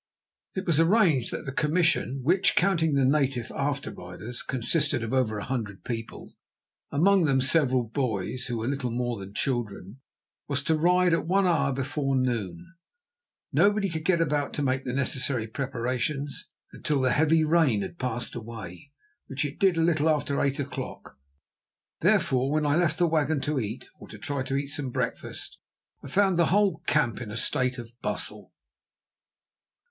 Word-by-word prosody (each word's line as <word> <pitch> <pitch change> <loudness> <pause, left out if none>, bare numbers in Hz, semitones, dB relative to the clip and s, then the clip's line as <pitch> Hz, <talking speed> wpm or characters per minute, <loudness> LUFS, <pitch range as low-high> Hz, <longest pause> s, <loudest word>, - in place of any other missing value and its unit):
It 190 0 -3
was 165 -3 +2
arranged 165 - +4
that - - -5
the 135 - -3
commission, 150 -3 +1
which, 180 +7 +3
counting 165 -6 +2
the 135 -1 +3
native 135 -4 +1
after 140 0 -2
riders, 95 +7 -6
consisted 130 +1 0
of 115 +2 -4
over 120 -5 +1
a 105 - -4
hundred 110 -7 -4
people, 115 -2 -6 0.6
among 185 +4 +4
them 135 -3 +3
several 130 -2 +3
boys, 120 -1 -2
who 120 -2 -2
were 110 +1 -3
little 135 -2 -1
more 120 -1 -2
than 100 +1 -9
children, 115 -3 -3 0.5
was 140 0 -1
to 160 - +2
ride 180 +2 +3
at 165 - 0
one 195 +2 +3
hour 170 -5 +2
before 135 +1 -1
noon. 110 - -2 0.8
Nobody 205 -1 +3
could 160 -2 -4
get 175 0 +2
about 150 -3 0
to 145 - -2
make 135 0 0
the 125 - -2
necessary 130 -2 +1
preparations 135 +4 -3 0.2
until 150 -2 -1
the 130 -1 +2
heavy 155 +4 +3
rain 155 -10 +3
had 175 - -8
passed 125 -1 -3
away, 115 -1 -8 0.4
which 140 +2 -2
it 145 +1 -6
did 190 -4 +3
a - - +3
little 160 -2 +2
after 145 -2 0
eight 140 0 0
o'clock. 140 -2 -6 0.8
Therefore 130 +1 +2
when 155 0 +1
I 145 0 +2
left 165 -2 +2
the 175 - +3
wagon 155 -2 +1
to 150 -1 -1
eat, 110 0 -5
or - - -11
try 145 -3 -4
to 135 +1 -2
eat 140 0 -2
some 145 -2 -3
breakfast, - - -4 0.4
I - - -8
found 190 +3 +2
the 170 - +4
whole 200 +1 +2
camp 120 -6 +1
in 115 - -6
a 105 - -5
state 130 +2 +1
of 120 -1 -8
bustle. - - -4
140 Hz, 170 wpm, -27 LUFS, 125-160 Hz, 0.8 s, arranged